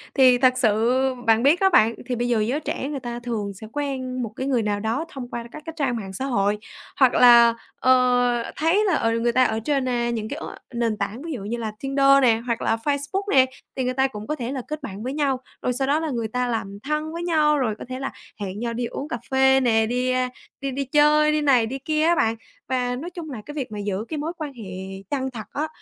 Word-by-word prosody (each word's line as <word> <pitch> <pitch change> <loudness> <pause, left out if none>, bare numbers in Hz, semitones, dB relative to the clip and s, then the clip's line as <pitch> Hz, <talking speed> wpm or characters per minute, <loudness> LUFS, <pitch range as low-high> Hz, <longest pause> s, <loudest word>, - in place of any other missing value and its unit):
thì 255 -2 +6
thật 255 0 +4
sự 230 +2 +2 0.3
bạn 225 +1 +4
biết 295 +6 +5
đó 385 - +4
bạn, 230 - +4
thì 250 - -2
bây 240 +1 -1
giờ 235 -2 +2
giới 240 +7 0
trẻ 275 -2 -3
người 285 - -3
ta 240 -1 -5
thường 225 -4 -3
sẽ 205 +3 -10
quen 260 -3 -3
một 225 - -3
cái 260 - -3
người 255 -4 +2
nào 205 -1 -1
đó 230 +9 -1
thông 265 -7 -7
qua 235 - -5
các 305 - -10
cái 325 - -6
trang 270 -5 0
mạng 195 -3 -7
xã 260 +8 -3
hội. 205 -5 +1 0.4
Hoặc 260 -2 +5
là, 235 -1 +7 0.3
ờ, 245 -2 +3
thấy 345 +7 +2
là, 370 -5 +2
ờ, 225 -5 +1
người 240 +1 +2
ta 255 +2 +4
ở 220 -3 +1
trên, 270 +3 0
a, 240 -1 0
những 220 -2 -3
cái 285 - -4
ứng - - -6 0.2
nền 230 -3 0
tảng 205 +4 -3
ví 330 +1 -6
dụ 240 - -5
như 225 +4 -3
là 225 -2 -3
Tinder 275 0 +4
nè 230 -3 +4
hoặc 235 -2 -1
là - - +2
Facebook 285 - -2
nè 260 -2 +6 0.3
thì 260 - -1
người 255 - -1
ta 265 +1 +2
cũng 215 -5 -8
có 305 - -1
thể 250 -3 -4
là 270 - -3
kết 305 0 -5
bạn 200 +2 -6
với 260 +2 -3
nhau 280 -3 0 0.2
rồi 250 - 0
sau 265 +2 -1
đó 290 +3 +2
là 320 -1 -2
người 235 -5 -2
ta 250 +3 -1
làm 200 -4 -3
thân 305 +2 -2
với 340 +1 -4
nhau 305 -3 +3
rồi 235 -6 0
có - - -7
thể 255 0 -4
là 270 - -3 0.3
hẹn 195 0 -4
nhau 235 0 -2
đi 240 +1 -2
uống 270 +4 -5
cà 240 - -3
phê 265 0 +5
nè, 225 -4 +3
đi, 250 +2 0
a, 255 0 +1 0.3
đi 275 0 -2
đi 275 +2 -2
chơi 300 +2 +4
đi 305 0 +1
này 265 -6 +4
đi 265 +4 -5
kia 310 +2 0
á 340 +2 +4
bạn. 225 -7 +2 0.3
Và 250 -1 0
nói 305 +8 -5
chung 340 -3 -8
là 245 -6 -6
cái 295 - -8
việc 275 -7 -4
mà 210 - -5
giữ 205 +1 -3
cái 315 - -3
mối 310 +3 -3
quan 305 -4 -5
hệ 235 -4 -10 0.5
chân 265 -2 -1
thật 225 -4 -7
á, 300 +2 -1
255 Hz, 265 wpm, -23 LUFS, 230-285 Hz, 0.5 s, là